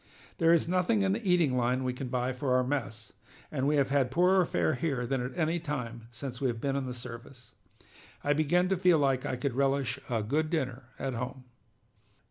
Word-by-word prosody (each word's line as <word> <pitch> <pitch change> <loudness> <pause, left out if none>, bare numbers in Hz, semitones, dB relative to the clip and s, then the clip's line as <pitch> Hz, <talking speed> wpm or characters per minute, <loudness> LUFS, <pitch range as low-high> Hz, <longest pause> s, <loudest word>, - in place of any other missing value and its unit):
There 165 -1 +5
is 170 -1 +3
nothing 185 +4 +2
in 195 0 +2
the 230 +3 -3
eating 175 -8 +3
line 125 +1 +1
we 125 -1 -1
can 125 +1 -5
buy 125 +1 -1
for 125 0 0
our 130 - +3
mess, 115 -5 -4 0.4
and 130 +1 0
we 150 - +3
have 135 -2 +2
had 135 -3 +2
poorer 180 +6 +4
fare - - +1
here 135 -3 -1
than 130 +1 -1
at 125 +1 -6
any 165 +1 +1
time 120 -8 -5
since 125 +1 -7
we 135 - +2
have 115 -2 -2
been 135 +2 -1
in 135 -2 -2
the 125 - -4
service. 125 +1 -10 0.7
I 145 - +3
begin 155 +5 +2
to 190 - +1
feel 180 -2 +4
like 135 -3 +1
I - - -1
could 130 +1 -2
relish 135 -1 0
a 115 -3 0
good 155 +8 0
dinner 135 -6 -2
at 135 0 -3
home!" 125 +2 -5
135 Hz, 215 wpm, -30 LUFS, 125-155 Hz, 0.7 s, There